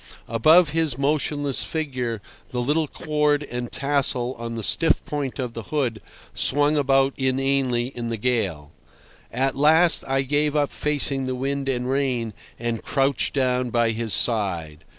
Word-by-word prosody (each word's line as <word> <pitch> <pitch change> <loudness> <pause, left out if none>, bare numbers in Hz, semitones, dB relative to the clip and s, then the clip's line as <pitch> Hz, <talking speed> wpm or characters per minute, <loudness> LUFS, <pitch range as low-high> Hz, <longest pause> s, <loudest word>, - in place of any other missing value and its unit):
Above 155 +9 +5
his 155 -4 0
motionless 145 -1 0
figure 125 -9 -3 0.3
the 125 - -4
little 150 +5 0
cord 150 0 0
and 120 -3 -6
tassel 135 -3 0
on 115 0 -5
the 115 - -5
stiff 165 +10 +2
point 145 -3 -4
of 125 -4 -4
the 115 - -6
hood 125 -3 -2 0.3
swung 145 +2 +2
about 135 -1 +2
inanely 130 -2 0
in 120 -3 -6
the 115 - -3
gale. 100 -11 -2 0.6
At 135 +2 -1
last 160 +4 +4
I 135 0 +1
gave 145 +2 0
up 145 -1 +1
facing 140 -3 -1
the 130 - -2
wind 135 +1 -2
and 125 -1 -1
rain, 130 -5 -1 0.2
and 115 -1 -3
crouched 135 -2 0
down 125 -2 0
by 115 -1 +1
his 115 0 -3
side. 85 -11 +1
135 Hz, 150 wpm, -23 LUFS, 120-145 Hz, 0.6 s, Above